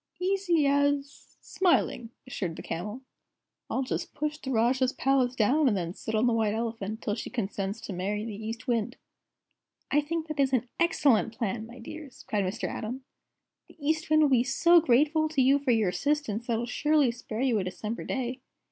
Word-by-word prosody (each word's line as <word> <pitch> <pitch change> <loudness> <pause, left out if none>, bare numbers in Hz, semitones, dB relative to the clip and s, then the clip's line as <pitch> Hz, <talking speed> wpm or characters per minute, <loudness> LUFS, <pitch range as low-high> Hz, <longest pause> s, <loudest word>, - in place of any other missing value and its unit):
"Easy 365 -4 +1
as 285 0 0
smiling," 340 -10 +1 0.2
assured 185 -10 -4
the - - -8
Camel. 210 +9 -5 0.7
"I'll 265 - 0
just 260 - -4
push 300 +1 -2
the 265 - -6
Rajah's 255 +2 +2
Palace 260 -2 +1
down, 265 +7 +3
and 210 -5 +2
then 170 -1 -3
sit 220 +3 -4
on 220 +3 +3
the 240 - +3
White 220 -2 +1
Elephant 225 -2 -4
till 205 - -1
she 220 - -5
consents 200 -3 -3
to 200 - -6
marry 205 +4 -2
the 225 - -5
East 225 +3 -6
Wind." 240 0 -1 0.9
"I 295 - +4
think 320 +2 -3
that 305 -2 -6
is 270 -1 +2
an 250 -1 +1
excellent 275 - +2
plan, 220 0 -2
my 235 +2 -12
dears!" 275 +3 -10
cried 205 -2 0
Mr. 190 +5 -3
Atom. 250 +5 -5 0.6
"The - - -19
East 310 +2 -1
Wind 310 0 +5
will 295 - +4
be 250 -3 +4
so 335 +6 +5
grateful 305 +3 +3
to 305 -3 -2
you 270 +2 +5
for 280 -2 -3
your 220 -5 +3
assistance 235 +2 -1
that 235 - 0
he'll 230 +1 -1
surely 295 +1 +2
spare 230 -1 -6
you 250 -5 +2
a - - -1
December 200 +5 -5
day. 255 -1 -3
250 Hz, 190 wpm, -28 LUFS, 220-285 Hz, 0.9 s, Wind